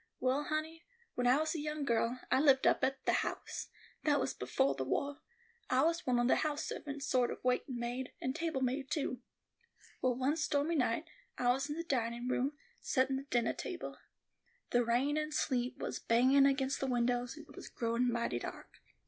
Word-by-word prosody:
Well, 265 +3 +1
honey, 315 +2 -3 0.3
when 245 0 0
I 255 +2 +6
was 315 +1 0
a 325 - -3
young 300 -1 -3
girl, 235 0 +1
I 260 - +5
lived 275 -3 +5
up - - +4
at 270 0 0
The - - +3
House; - - -4 0.4
that 290 -2 +3
was - - -1
befo' 135 +2 +1
the 135 - -3
wah. 280 - -1 0.5
I 260 +1 +4
was 335 0 +1
one 250 -1 +3
of 240 0 +3
the - - +4
house 300 -1 -1
servants, 280 -1 -5
sort 250 -3 +2
of - - -4
waitin' 250 0 0
maid, 245 +2 -3
and 260 +1 -2
table 325 -5 -1
maid, 260 +1 -1
too. 260 -5 -2 0.8
Well, 255 -1 +2
one 265 +5 +1
stormy 310 0 +1
night, 255 +2 +1 0.3
I 245 - +2
was 270 +3 -1
in 295 - -3
the 335 - -2
dinin' 240 -4 -1
room, 265 +3 +1 0.3
settin' 265 -1 +1
the 275 - -6
dinnah 240 -4 +1
table. - - -6 0.7
The 245 0 +4
rain 250 +6 +1
and 305 0 -1
sleet 250 -4 0
was - - -4
bangin' 260 +4 +5
aginst 270 0 +1
the 270 - -1
windows, 245 +1 0
and 310 - -10
it 285 - -15
was - - -9
growin' 235 +1 0
mighty 235 - -1
dark. - - -8
260 Hz, 200 wpm, -34 LUFS, 245-290 Hz, 0.8 s, I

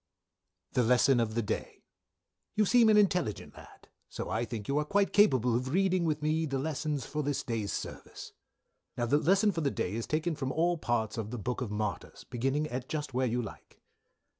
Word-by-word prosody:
"The 125 - +2
Lesson 125 +2 +4
of 110 -2 -1
the 115 - +1
Day." - - -4 0.7
"You 215 0 +3
seem 235 +2 +5
an 215 - +6
intelligent 180 - +1
lad, - - -15 0.2
so - - -5
I 115 +2 0
think 110 -4 -6
you 140 +2 +1
are - - +1
quite 200 +6 +1
capable 130 - +4
of 125 +2 -1
Reading 185 +2 +2
with 150 -2 -1
me 155 +1 +1
the 135 -1 -2
Lessons 150 -1 -2
for 150 - -3
this 145 -1 -1
day's 110 -4 -2
service. - - -7 0.6
"Now 120 - 0
the 145 +5 +3
Lesson 195 +7 +3
for 165 -3 -3
the 140 - +1
day 90 - -3
is 115 +1 -3
taken 160 +2 0
from 135 -3 -3
all 170 +2 +1
parts 115 -4 -1
of 105 -1 -4
the 125 - -5
Book 125 +4 -3
of 125 - -3
Martyr's, 105 0 -4
beginning 135 +5 -1
at 125 +1 -5
just 150 -4 -3
where 130 +1 +1
you 120 +1 -1
like. 105 - -11
135 Hz, 205 wpm, -30 LUFS, 120-160 Hz, 0.7 s, an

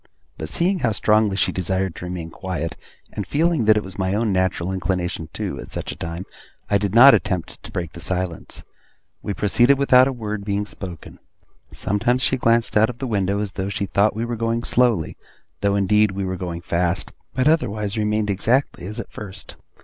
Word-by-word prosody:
But 80 -1 -6
seeing 180 - +1
how 115 -6 +1
strongly 105 0 +2
she - - +2
desired 95 0 -1
to - - -6
remain 90 -2 -5
quiet, 85 -3 -4 0.4
and 100 -3 -4
feeling 160 -4 +1
that 110 0 +6
it 105 - 0
was 95 +1 -9
my 95 +1 0
own 110 -1 +1
natural 95 -1 0
inclination 90 -3 -2
too, - - -4
at - - -8
such - - -5
a - - -7
time, 85 +3 -5 0.5
I 100 - +4
did 100 0 -2
not 135 +4 +10
attempt 90 -3 -1
to - - -11
break 85 -3 -4
the - - -9
silence. 90 0 -3 0.6
We 100 - -3
proceeded 120 +6 +4
without 130 -2 +6
a - - 0
word 105 -4 -4
being 100 0 -1
spoken. 90 -6 -9 0.5
Sometimes 120 +6 0
she - - +2
glanced 115 -1 +2
out 110 +2 +5
of 120 - -6
the 135 - -4
window, 100 -4 0
as 105 -2 -3
though 95 0 -3
she 100 0 -2
thought 100 +2 +2
we 115 +2 -2
were 120 0 -3
going 115 +1 -1
slowly, 120 -12 +2 0.4
though 100 0 +1
indeed 105 +2 +3
we 95 0 -2
were 95 0 -2
going 85 -2 -5
fast; 85 +2 -1 0.2
but 130 +1 +2
otherwise 110 -10 +1
remained 105 -1 0
exactly 110 -2 0
as 105 +4 -6
at - - -7
first. 100 -2 -7
100 Hz, 200 wpm, -22 LUFS, 95-115 Hz, 0.6 s, not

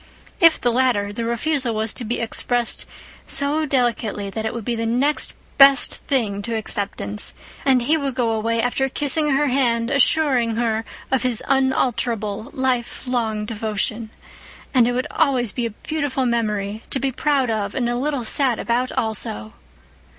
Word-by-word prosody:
If 330 -1 +6
the 245 - +1
latter, 235 -5 +1
the 230 +2 -3
refusal 245 0 -1
was 220 0 0
to - - -4
be 235 +2 -2
expressed 240 +1 -1 0.4
so 300 +2 +2
delicately 235 -6 -1
that 220 +2 -3
it - - -2
would 235 -3 -6
be 240 - -1
next 245 +6 0 0.2
best 275 -1 +7
thing 215 -7 -1
to 230 +3 -4
acceptance, 200 - -3 0.3
and 260 -3 +4
he 310 +6 +2
would 275 -4 -3
go 240 -3 +1
away, 225 +1 0
after 270 +2 0
kissing 295 +3 +1
her 295 +2 +2
hand, 235 -3 +1
assuring 275 -5 +2
her 225 -1 0 0.3
of 265 -2 +2
his 250 -3 0
unalterable, 240 -5 0
life 255 -2 -2
long 220 -4 -1
devotion. 220 +1 -2 0.6
And 245 -3 +5
it 245 - 0
would 255 +2 -1
always 260 -8 +1
be 240 +1 -2
a 220 - -11
beautiful 290 -4 -1
memory, 215 -3 -1
to 270 - +1
be 270 0 0
proud 270 -2 +1
of 205 -2 -2
and 245 -3 0
a 240 - -1
little 270 -1 -2
sad 255 0 +2
about, 245 +2 -1
also. 110 - -2
240 Hz, 165 wpm, -21 LUFS, 220-265 Hz, 0.6 s, best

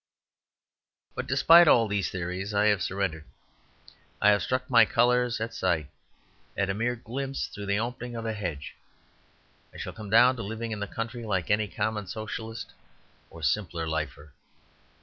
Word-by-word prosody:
But, 130 - -5
despite 165 +6 +7
all 115 -6 +5
these 100 -1 -1
theories, 95 +3 -4
I 105 +1 +3
have 105 -3 +2
surrendered; 95 -5 -2 1.0
I 105 - +6
have 100 - +2
struck 130 0 -1
my 120 -2 +7
colours 120 +1 +2
at 115 +1 -4
sight; 80 -6 -1 0.7
at 100 -1 +1
a - - -1
mere 120 +4 -1
glimpse 135 +4 -4
through 100 -1 -8
the 100 0 +1
opening 120 +1 -4
of 115 -1 -5
a 110 - -1
hedge. 85 -9 -5 1.0
I - - -13
shall - - -6
come 110 -2 -9
down 125 +4 +6
to - - -4
living 115 +2 -5
in 105 - -4
the 105 - -3
country, 115 +4 -5
like 95 -4 -1
any 105 0 +2
common 105 0 -3
Socialist 110 +2 -6 0.6
or 80 - -12
Simple 85 +1 -1
Lifer. 75 -2 -4
110 Hz, 165 wpm, -27 LUFS, 95-120 Hz, 1.0 s, despite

